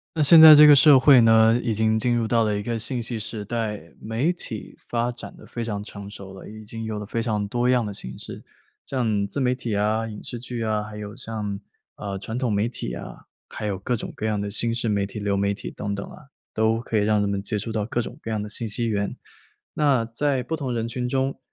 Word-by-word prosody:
那 155 - 0
现 155 +3 +8
在 160 -1 +12
这 150 0 +9
个 145 - +9
社 140 -1 +7
会 135 -1 +7
呢， 115 +1 +5
已 115 -2 0
经 110 +1 +1
进 120 +2 +1
入 115 -1 0
到 115 0 +2
了 105 -1 0
一 100 - -2
个 115 +2 -3
信 120 +2 -3
息 115 0 -3
时 110 0 -5
代， 110 -1 -3 0.2
媒 115 +9 0
体 120 - -8
发 120 0 -1
展 120 - -10
得 - - -16
非 120 - -6
常 105 -3 -4
成 100 -1 -9
熟 95 -1 -10
了。 95 - -11
已 110 +1 -10
经 115 +1 -7
有 110 -1 -4
了 105 - -6
非 115 +2 -3
常 105 -3 -1
多 120 +4 0
样 125 -1 +3
的 105 - -4
形 65 -8 -5
式。 - - -9 0.4
像 110 -6 0
自 100 +8 -5
媒 125 -1 +1
体 120 -4 -4
啊、 105 +2 +1
影 105 -2 -9
视 120 - -7
剧 120 -1 -6
啊， 110 -1 0
还 105 0 -9
有 105 0 -7
像， 105 -3 -5 0.4
呃， 100 -2 -5
传 110 +4 -5
统 125 -4 0
媒 105 +3 +1
体 - - -6
啊， - - -9 0.2
还 - - -6
有 100 -3 -2
各 120 +5 -1
种 110 - -6
各 110 - -3
样 105 -1 -1
的 100 0 -4
新 115 +2 +1
式 115 0 -2
媒 100 -2 +1
体、 105 +2 -7
流 100 -1 -1
媒 100 0 +1
体， 100 - -6
等 100 -1 -4
等 100 - -6
啊， 150 - -14 0.3
都 110 +1 +1
可 115 - -5
以 105 - +4
让 105 0 +2
人 105 - +1
们 100 -1 -2
接 105 +1 -2
触 105 +3 -4
到 110 -2 -1
各 115 +3 -2
种 120 - -5
各 - - -7
样 110 -1 -1
的 - - -6
信 110 +2 -2
息 115 +3 0
源。 100 -2 -2 0.6
那 140 -6 +2
在 130 +3 -1
不 160 +7 -3
同 140 -5 -4
人 115 -1 -2
群 125 +1 -3
中， 135 +1 -1
110 Hz, 280 characters per minute, -24 LUFS, 105-120 Hz, 0.6 s, 在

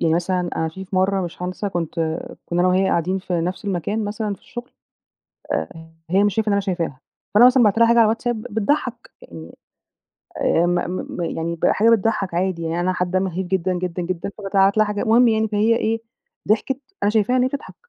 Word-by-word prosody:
يعني 160 -1 +2
مثلًا 180 +1 0 0.2
أنا 160 - 0
في 190 +4 -8
في 190 0 -5
مرّة 190 +1 +2
مش 175 +1 -8
هانسى 185 +3 -3
كنت 175 -4 -3 0.5
كُنّا 175 0 -1
أنا 180 - +4
وهي 185 +1 +3
قاعدين 185 +2 0
في 180 -2 -2
نفس 180 +5 -3
المكان 200 +3 -2
مثلًا 210 0 -3
في - - -21
الشُغل، 240 0 -9 0.8
آآ 160 0 -5 0.2
هي 195 +3 +4
مش 205 -2 +1
شايفة 220 0 0
إن - - +2
أنا 200 - +2
شايفاها، 175 -9 -3 0.3
فأنا 230 +4 +8
مثلًا 255 0 +5
بعت 215 0 +3
لها 230 - +6
حاجة 235 +1 +4
على 230 - +7
الواتساب 225 +1 -1
بتضحّك، 235 +3 -2
يعني 80 -1 -11 0.8
آآ 170 - +2
م 175 0 +1 0.4
م - - -3
يعني 170 0 -2
ب 165 - -2
حاجة 225 +3 +4
بتضحّك 220 -4 +1
عادي، 180 0 -1
يعني 165 +1 -2
أنا 185 +1 +1
حابّة 180 0 -1
أمهِّد 185 -1 -2
جدًا، 185 0 0
جدًا، 180 0 -3
جدًا، 180 +2 -3
فبابعت 195 0 +2
لها 215 - +5
حاجات. 210 +2 -2
المهم 235 +2 +5
يعني 220 -1 +2
فهي 215 +2 +2
إيه، 225 0 0 0.5
ضحكت، 230 +5 +1 0.2
أنا 205 - +3
شايفاها 220 +3 +2
إن - - +3
هي - - +3
بتضحك 280 +1 -7
195 Hz, 210 wpm, -21 LUFS, 175-220 Hz, 0.8 s, فأنا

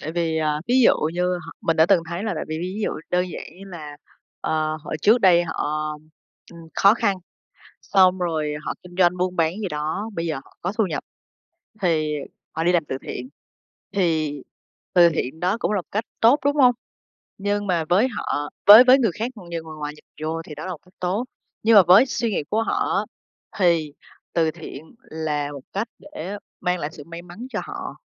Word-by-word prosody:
tại 155 - -5
vì, 165 -2 0
à, 150 -1 0
ví 245 - +3
dụ - - +7 0.2
như 180 +1 -1 0.2
họ 165 - -8
mình 165 - 0
đã 160 +1 +6
từng 180 -4 +4
thấy 170 +3 -4
là 215 - -1
tại - - -3
vì 155 0 -3
ví 180 +2 -4
ví 215 - -5
dụ - - 0 0.2
đơn 180 0 +1
giản - - -6 0.2
như 195 - -10
là, 155 -6 -9 0.4
ờ, 155 0 -1
họ - - -6
trước 225 +4 +6
đây 175 -2 +5
họ, 155 -1 -2 0.6
ừm, 170 - -12
khó 200 +3 +6
khăn, 205 -5 +1 0.7
xong 185 -1 +4
rồi 155 -4 -1
họ - - -2
kinh 180 0 -13
doanh 180 0 +4
buôn 180 0 -1
bán 165 0 +2
gì 200 - -2
đó, 160 +8 -3
bây 165 -1 -2
giờ 160 - -1
họ - - -23
có 180 - -2
thu 220 - +3
nhập 160 -4 -4 0.8
thì 155 -4 +1 0.4
họ 160 - 0
đi 175 - +3
làm 170 -4 +2
từ 130 - -4
thiện. 125 +1 -6 0.6
Thì 160 -7 0 0.5
từ 175 -1 +7
thiện 160 -1 -3
đó 185 +5 +1
cũng - - 0
là 210 - +1
một - - -32
cách 215 +2 -1 0.2
tốt, 240 +6 +6
đúng 285 +1 +3
hông? 250 -4 +6 0.6
Nhưng 205 +1 -1
mà 170 -4 +1
với 195 +8 +4
họ 145 -9 -3 0.2
với 215 +4 +12
với 255 +2 +6
người 230 -7 +2
khác 240 +3 -1
như 170 -5 -6
người 160 -1 -9
ngoài 150 0 -4
nhìn - - -20 0.2
vô 165 +1 -2
thì 150 -2 -10
đó 155 - -7
là 185 - -4
một 170 - -5
cách 180 - -24
tốt. 190 +7 -1 0.4
Nhưng 225 0 +5
mà 200 - +9
với 195 +9 +8
suy 235 -2 -1
nghĩ 180 - -1
của 225 +1 +1
họ - - 0
á - - +2 0.6
thì 165 -5 +2 0.4
từ 160 -2 +2
thiện 160 - -10
là 150 -2 -3
một 140 - -8
cách 210 +4 -1
để 205 -10 -7 0.2
mang 180 -1 0
lại 145 - -3
sự 145 - -10
may 170 +2 -9
mắn 180 +8 -9
cho - - -3
họ. - - -7
175 Hz, 220 wpm, -23 LUFS, 160-200 Hz, 0.8 s, với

